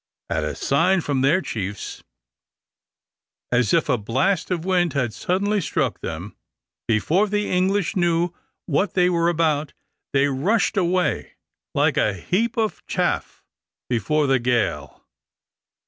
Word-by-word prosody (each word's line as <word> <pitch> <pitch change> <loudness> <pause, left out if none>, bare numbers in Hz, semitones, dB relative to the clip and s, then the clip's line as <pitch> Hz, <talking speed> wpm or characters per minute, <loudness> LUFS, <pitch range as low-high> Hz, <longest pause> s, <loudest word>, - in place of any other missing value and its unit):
At 80 - 0
a 75 - -3
sign 180 +7 +2
from 140 -4 -1
their 155 +8 +3
chiefs, 100 -2 -5 1.5
as 120 -3 +2
if - - +3
a 125 - +1
blast 135 - 0
of 175 -2 -2
wind 180 -3 +2
had 125 -6 -1
suddenly 200 - 0
struck - - -1
them, - - -6 0.5
before 160 - +2
the 210 0 -1
English 190 +2 +1
knew 175 -1 +1 0.3
what 180 +5 0
they 180 -1 +4
were 170 -1 +2
about, 155 -3 0 0.4
they 140 0 +3
rushed 150 +12 +1
away 180 -1 0 0.4
like - - +2
a 105 - +2
heap 215 - -1
of 220 -2 -1
chaff - - -2 0.5
before 150 +6 +1
the 135 -1 +3
gale. 105 - -1
165 Hz, 130 wpm, -23 LUFS, 125-185 Hz, 1.5 s, they